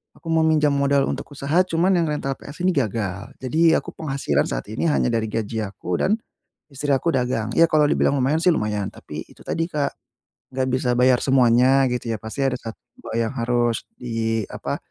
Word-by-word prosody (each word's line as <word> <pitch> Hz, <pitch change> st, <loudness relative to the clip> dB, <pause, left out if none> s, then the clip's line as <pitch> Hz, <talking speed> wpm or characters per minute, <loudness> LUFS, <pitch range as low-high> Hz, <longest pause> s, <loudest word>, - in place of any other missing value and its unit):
aku 165 Hz, -, -15 dB
mau 160 Hz, 0 st, +3 dB
minjam 155 Hz, -2 st, +3 dB
modal 140 Hz, 0 st, +2 dB
untuk -, -, -5 dB
usaha, 150 Hz, +6 st, +2 dB
cuman 170 Hz, +2 st, +1 dB
yang 170 Hz, -, +2 dB
rental 135 Hz, -2 st, -2 dB
PS 145 Hz, +5 st, -10 dB
ini 185 Hz, -, +4 dB
gagal. 110 Hz, -4 st, -2 dB
Jadi, 160 Hz, +6 st, +3 dB
aku -, -, -2 dB
penghasilan 135 Hz, -, 0 dB
saat -, -, -4 dB
ini 110 Hz, -, -2 dB
hanya -, -, +2 dB
dari 110 Hz, -1 st, 0 dB
gaji 110 Hz, 0 st, -2 dB
aku 90 Hz, -2 st, -3 dB
dan 210 Hz, -, +3 dB, 0.6 s
Istri 145 Hz, +1 st, -3 dB
aku 165 Hz, +5 st, 0 dB
dagang, 125 Hz, -3 st, 0 dB
ya 165 Hz, 0 st, +5 dB
kalau 150 Hz, -1 st, +4 dB
dibilang 145 Hz, -, +2 dB
lumayan 145 Hz, +5 st, +1 dB
sih 180 Hz, -, +4 dB
lumayan, 105 Hz, -, -1 dB
tapi -, -, -8 dB
itu -, -, -18 dB
tadi, 165 Hz, +1 st, -2 dB
Kak, 145 Hz, -2 st, -1 dB, 0.6 s
enggak 130 Hz, 0 st, -1 dB
bisa 130 Hz, -1 st, 0 dB
bayar 125 Hz, 0 st, +3 dB
semuanya 130 Hz, +1 st, +4 dB
gitu 120 Hz, -1 st, -2 dB
ya. 110 Hz, -, -3 dB
Pasti 110 Hz, +6 st, -4 dB
ada 125 Hz, -2 st, 0 dB
1, 115 Hz, -1 st, -7 dB, 0.2 s
2, -, -, -8 dB
yang 110 Hz, -, -2 dB
harus 120 Hz, -2 st, 0 dB
di 115 Hz, -2 st, -2 dB
apa, -, -, -4 dB
130 Hz, 195 wpm, -22 LUFS, 115-150 Hz, 0.6 s, ya